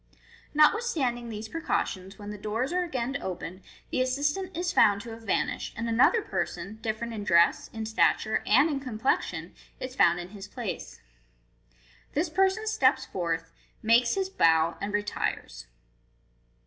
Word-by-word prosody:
Notwithstanding 300 Hz, -, +2 dB
these 220 Hz, 0 st, -6 dB
precautions, 195 Hz, -, -2 dB
when 205 Hz, 0 st, -7 dB
the 210 Hz, -, -6 dB
doors 225 Hz, -, -2 dB
are 365 Hz, -, +2 dB
again 270 Hz, -4 st, -2 dB
opened, 185 Hz, 0 st, -5 dB, 0.3 s
the -, -, +1 dB
assistant 295 Hz, +8 st, -1 dB
is 350 Hz, 0 st, -1 dB
found 200 Hz, -1 st, +5 dB
to 230 Hz, 0 st, -8 dB
have 225 Hz, 0 st, -9 dB
vanished, 210 Hz, -4 st, -1 dB
and 230 Hz, +1 st, -2 dB
another 250 Hz, -, +4 dB
person, 220 Hz, +2 st, -4 dB
dif 220 Hz, -1 st, -2 dB
ferent 235 Hz, 0 st, -4 dB
in 210 Hz, -2 st, -4 dB
dress, 170 Hz, -3 st, +4 dB
in 220 Hz, -1 st, -5 dB
stature, 220 Hz, 0 st, +2 dB
and 260 Hz, +8 st, +6 dB
in 290 Hz, -4 st, -1 dB
complexion, 255 Hz, -2 st, -1 dB, 0.3 s
is 255 Hz, 0 st, -5 dB
found 175 Hz, -8 st, +4 dB
in 175 Hz, 0 st, -7 dB
his 200 Hz, 0 st, -9 dB
place. 230 Hz, -2 st, -6 dB, 1.1 s
This 320 Hz, +4 st, +1 dB
person 385 Hz, +5 st, +2 dB
steps 265 Hz, -11 st, +2 dB
forth, 165 Hz, -2 st, -3 dB, 0.3 s
makes 235 Hz, +2 st, +4 dB
his 385 Hz, -1 st, 0 dB
bow, 160 Hz, -, +3 dB
and 200 Hz, +1 st, -2 dB
retires. 205 Hz, -, -3 dB
230 Hz, 150 wpm, -28 LUFS, 205-285 Hz, 1.1 s, and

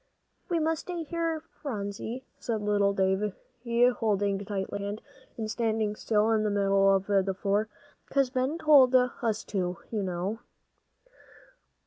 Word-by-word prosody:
"We 345 Hz, -, +1 dB
must 320 Hz, 0 st, 0 dB
stay 350 Hz, -2 st, -5 dB
here, 330 Hz, 0 st, -2 dB, 0.2 s
Phronsie," 220 Hz, 0 st, -4 dB, 0.2 s
said 220 Hz, -3 st, -2 dB
little 205 Hz, -1 st, +2 dB
Davie, 190 Hz, +1 st, 0 dB, 0.6 s
holding 205 Hz, -3 st, +1 dB
tightly 195 Hz, -1 st, -3 dB
to -, -, -5 dB
her 200 Hz, -, -5 dB
hand, 205 Hz, +2 st, -5 dB, 0.4 s
and 220 Hz, -2 st, -3 dB
standing 220 Hz, -2 st, 0 dB
still 215 Hz, 0 st, +1 dB
in 220 Hz, -1 st, +3 dB
the 215 Hz, -, +1 dB
middle 195 Hz, -1 st, +3 dB
of 195 Hz, 0 st, -1 dB
the 195 Hz, -1 st, +1 dB
floor, 205 Hz, +2 st, +1 dB, 0.4 s
"'cause 275 Hz, -2 st, +2 dB
Ben 260 Hz, +4 st, 0 dB
told 280 Hz, -5 st, +6 dB
us 240 Hz, -3 st, +1 dB
to, 180 Hz, -3 st, -2 dB
you 215 Hz, -3 st, -1 dB
know." 190 Hz, +3 st, -3 dB
210 Hz, 145 wpm, -28 LUFS, 200-250 Hz, 0.6 s, told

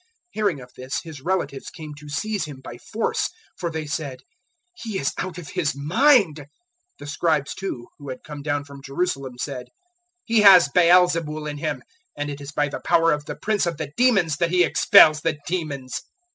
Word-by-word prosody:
003:021 365 Hz, -, -39 dB, 0.2 s
Hearing 200 Hz, -10 st, -1 dB
of 125 Hz, 0 st, -14 dB
this, 130 Hz, +1 st, -4 dB
His 160 Hz, -5 st, -10 dB
relatives 170 Hz, -4 st, -2 dB
came 155 Hz, -3 st, -9 dB
to 145 Hz, 0 st, -12 dB
seize 205 Hz, +7 st, -2 dB
Him 145 Hz, -3 st, -9 dB
by 120 Hz, -2 st, -10 dB
force, 220 Hz, -, -2 dB, 0.3 s
for 170 Hz, -, -3 dB
they 160 Hz, -1 st, -4 dB
said, 145 Hz, -4 st, -4 dB, 0.5 s
"He 225 Hz, -, -5 dB
is 135 Hz, -, -1 dB
out 185 Hz, -2 st, -4 dB
of 165 Hz, -5 st, -8 dB
his 145 Hz, -, -1 dB
mind." 195 Hz, -, +4 dB
003:022 145 Hz, -, -9 dB, 0.5 s
The -, -, -10 dB
Scribes, 150 Hz, -1 st, 0 dB
too, 160 Hz, -12 st, -5 dB
who 140 Hz, -1 st, -9 dB
had 130 Hz, -1 st, -7 dB
come 150 Hz, -2 st, -8 dB
down 145 Hz, 0 st, -1 dB
from 140 Hz, -1 st, -12 dB
Jerusalem 135 Hz, -3 st, -3 dB
said, 125 Hz, -1 st, -5 dB, 0.6 s
"He 225 Hz, -2 st, +3 dB
has 185 Hz, -7 st, +8 dB
Baal 180 Hz, +3 st, +6 dB
zebul 155 Hz, -3 st, -3 dB
in 145 Hz, -1 st, -5 dB
him; -, -, -3 dB, 0.3 s
and 145 Hz, 0 st, -3 dB
it 140 Hz, 0 st, -8 dB
is 140 Hz, 0 st, -7 dB
by 145 Hz, 0 st, 0 dB
the 145 Hz, -, -6 dB
power 165 Hz, -1 st, +4 dB
of 150 Hz, 0 st, -1 dB
the -, -, -5 dB
Prince 210 Hz, -4 st, 0 dB
of 170 Hz, -3 st, -2 dB
the 150 Hz, -2 st, -5 dB
demons 195 Hz, -, +3 dB
that 170 Hz, +1 st, +1 dB
he 180 Hz, 0 st, +4 dB
expels 155 Hz, -2 st, +6 dB
the 160 Hz, -2 st, -1 dB
demons." 145 Hz, -7 st, -3 dB
155 Hz, 200 wpm, -23 LUFS, 140-180 Hz, 0.6 s, has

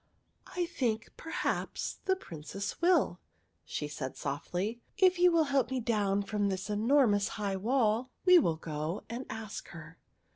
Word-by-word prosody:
" -, -, -26 dB
I 355 Hz, -, +2 dB
think, 240 Hz, -10 st, -2 dB
perhaps, 325 Hz, -, -3 dB
the 380 Hz, -, +3 dB
Princess 195 Hz, -, -6 dB
will," 355 Hz, +1 st, +3 dB, 0.4 s
she 150 Hz, -, -4 dB
said 140 Hz, -3 st, -5 dB
softly, 180 Hz, +11 st, -3 dB
" -, -, -41 dB
If 370 Hz, -2 st, +4 dB
you 360 Hz, 0 st, +6 dB
will 330 Hz, -1 st, +4 dB
help 270 Hz, -3 st, +3 dB
me 260 Hz, -1 st, -1 dB
down 205 Hz, -4 st, +1 dB
from 205 Hz, 0 st, 0 dB
this 190 Hz, +2 st, -3 dB
enormous 215 Hz, -1 st, +3 dB
high 200 Hz, -2 st, -1 dB
wall, 230 Hz, +2 st, +1 dB, 0.2 s
we 365 Hz, -1 st, +9 dB
will 165 Hz, -, +1 dB
go 155 Hz, +3 st, -4 dB
and 245 Hz, +3 st, -5 dB
ask 220 Hz, -2 st, -6 dB
her." 165 Hz, 0 st, -11 dB
215 Hz, 160 wpm, -31 LUFS, 190-270 Hz, 0.4 s, we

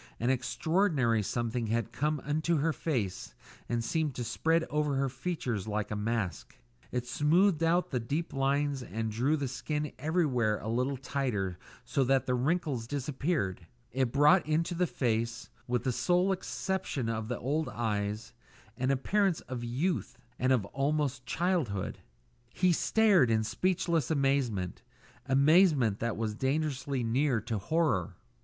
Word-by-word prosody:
An 120 Hz, +3 st, +2 dB
extraordinary 135 Hz, -, +1 dB
something 120 Hz, +2 st, -2 dB
had 115 Hz, +1 st, -1 dB
come 150 Hz, +6 st, 0 dB
into 155 Hz, +3 st, 0 dB
her 155 Hz, +3 st, +1 dB
face 105 Hz, -, -3 dB, 0.3 s
and 120 Hz, -1 st, 0 dB
seemed 150 Hz, +2 st, -1 dB
to 125 Hz, -, -3 dB
spread 165 Hz, +7 st, +1 dB
over 150 Hz, -2 st, 0 dB
her 135 Hz, 0 st, +1 dB
features 125 Hz, -, -3 dB
like 105 Hz, 0 st, -2 dB
a -, -, -1 dB
mask; 105 Hz, -, -3 dB, 0.3 s
it 125 Hz, -1 st, -2 dB
smoothed 160 Hz, +7 st, +3 dB
out 170 Hz, +2 st, +2 dB
the 125 Hz, -, 0 dB
deep 145 Hz, +9 st, -3 dB
lines 140 Hz, 0 st, +1 dB
and 110 Hz, -2 st, -3 dB
drew 130 Hz, +8 st, +1 dB
the 140 Hz, -2 st, -2 dB
skin 150 Hz, +4 st, -3 dB
everywhere 135 Hz, -9 st, +1 dB
a -, -, -7 dB
little 125 Hz, +4 st, 0 dB
tighter 125 Hz, -9 st, -2 dB, 0.3 s
so 140 Hz, -, +1 dB
that 135 Hz, 0 st, +2 dB
the 125 Hz, -, 0 dB
wrinkles 135 Hz, -2 st, 0 dB
disappeared; 135 Hz, -, -2 dB, 0.2 s
it 130 Hz, -2 st, 0 dB
brought 150 Hz, +7 st, +5 dB
into 165 Hz, +3 st, +1 dB
the 180 Hz, +1 st, +1 dB
face 115 Hz, -4 st, -2 dB, 0.2 s
with 120 Hz, -1 st, 0 dB
the 130 Hz, -, +1 dB
sole 180 Hz, +8 st, +2 dB
exception 190 Hz, -, -2 dB
of 110 Hz, -1 st, -2 dB
the 120 Hz, -, -2 dB
old 145 Hz, +3 st, -1 dB
eyes 105 Hz, -1 st, -2 dB, 0.4 s
an 130 Hz, +1 st, 0 dB
appearance 185 Hz, +7 st, +1 dB
of 125 Hz, -2 st, -6 dB
youth 145 Hz, +9 st, -1 dB, 0.2 s
and 130 Hz, +1 st, +2 dB, 0.2 s
almost 140 Hz, 0 st, 0 dB
of 125 Hz, -, -34 dB
childhood. 140 Hz, -, -1 dB, 0.6 s
He 180 Hz, -1 st, +3 dB
stared 195 Hz, -, +4 dB
in 110 Hz, -1 st, +2 dB
speechless 170 Hz, -, 0 dB
amazement 135 Hz, -, 0 dB, 0.5 s
amazement 140 Hz, -, +4 dB
that 115 Hz, -1 st, -2 dB
was 110 Hz, -1 st, -1 dB
dangerously 135 Hz, +1 st, -1 dB
near 125 Hz, +2 st, +2 dB
to 110 Hz, -1 st, -3 dB
horror. 125 Hz, -, 0 dB
135 Hz, 150 wpm, -30 LUFS, 115-155 Hz, 0.6 s, brought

